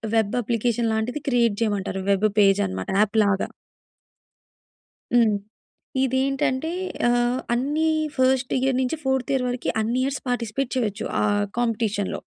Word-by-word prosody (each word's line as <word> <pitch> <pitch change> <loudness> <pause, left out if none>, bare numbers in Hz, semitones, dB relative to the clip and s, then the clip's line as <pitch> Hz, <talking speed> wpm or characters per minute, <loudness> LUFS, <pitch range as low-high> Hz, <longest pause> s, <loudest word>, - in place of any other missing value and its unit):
Web 220 -1 +2
application 230 0 0
లాంటిది 245 +6 -2
create 235 -4 +2
చేయమంటారు. 200 -3 -1
Web 200 +2 +3
page 195 -1 +5
అనమాట 95 0 -5
యాప్‌లాగా. 205 -2 +2 1.6
హ్మ్. 225 -4 +4 0.7
ఇదేంటంటే 265 +3 0 0.4
ఆహ్, 240 +1 +2
అన్ని 295 +6 0 0.3
ఫస్ట్ 260 0 +2
ఇయర్ 265 0 +1
నుంచి 260 +5 -1
4త్ 265 0 0
ఇయర్ 265 -2 +1
వరకి 245 0 -2
అన్ని 235 +3 -1
ఇయర్స్ 275 +1 -2
పార్టిసిపేట్ 245 +2 -2
చేయొచ్చు. 220 -3 -2 0.2
ఆహ్, 205 -1 +2
కాంపిటీషన్‌లో. 220 -4 -1
240 Hz, 120 wpm, -24 LUFS, 210-260 Hz, 1.6 s, page